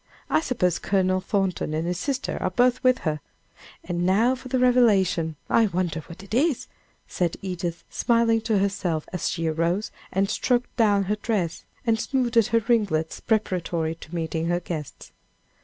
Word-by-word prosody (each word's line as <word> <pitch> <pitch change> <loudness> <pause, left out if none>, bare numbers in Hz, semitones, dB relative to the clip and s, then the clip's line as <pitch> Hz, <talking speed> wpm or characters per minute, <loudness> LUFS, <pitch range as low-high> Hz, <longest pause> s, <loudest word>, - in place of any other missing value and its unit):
I - - +4
suppose 205 - 0
Colonel 185 -1 +1
Thornton 190 -6 -1
and 160 +1 -1
his 175 0 -2
sister 270 +1 -2
are - - +1
both 245 +6 +2
with 255 0 +5
her! 155 -1 0 0.6
And 175 0 -2
now 210 +8 +3
for 260 0 -8
the 260 +1 0
revelation! 205 -10 +3
I 225 -1 +4
wonder 175 -4 -1
what 170 +4 -11
it 195 - -11
is," 255 0 +2 0.4
said 175 -2 -1
Edith, 175 -2 -4
smiling 230 -1 +2
to 220 -1 +1
herself, 190 -5 0
as 180 - -1
she 165 -2 -2
arose 170 +6 0 0.2
and 195 +1 +1
stroked 245 +4 0
down 205 -4 +3
her 210 +3 -1
dress, 200 -7 -2 0.2
and 225 -1 +2
smoothed 240 -5 +2
her 230 -2 +2
ringlets, 200 -10 +1
preparatory 175 -7 0
to 165 +1 -10
meeting 165 0 -2
her 175 0 +1
guests. 160 -4 -7
195 Hz, 165 wpm, -25 LUFS, 170-230 Hz, 0.6 s, with